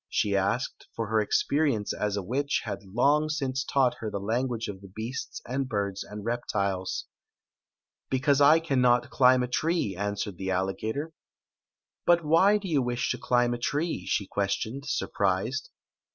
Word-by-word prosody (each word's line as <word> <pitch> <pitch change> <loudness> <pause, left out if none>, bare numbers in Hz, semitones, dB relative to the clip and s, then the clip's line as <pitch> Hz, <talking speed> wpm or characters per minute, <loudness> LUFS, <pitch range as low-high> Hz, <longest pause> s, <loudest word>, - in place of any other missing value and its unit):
" - - -66
she 100 -1 +1
asked, 100 +6 -1
for 115 -2 -3
her 110 0 +3
experience 130 +1 +1
as 105 -1 -1
a 100 - -2
witch 140 +8 -1
had - - -4
bng 140 +10 +2
since 135 -3 -1
taught 135 -3 +2
her 110 - -3
the 105 - -3
language 115 +3 -1
of 95 -2 -7
the 100 - -11
beasts 110 +6 -5
and 130 +1 -2
birds 100 -3 -2
and 105 0 -9
reptiles. 100 -5 -2 1.0
"Because 135 +2 +2
I 150 +3 +7
cannot 125 -6 +2
climb 125 -1 +5
a - - -1
tree," 155 - 0
answered 100 -1 -3
the 95 0 -4
alligator. 110 - -2 0.5
" - - -66
But 170 -2 +4
why 190 +7 +5
do 200 -2 -6
you 150 -6 +2
wish 125 0 -1
to - - -3
climb 120 -1 +2
a 120 - -4
tree?" 145 - -2
she 100 - 0
ques 100 +1 0
tioned, 135 +6 -5
surprised. 100 +1 -1
120 Hz, 170 wpm, -28 LUFS, 100-140 Hz, 1.0 s, I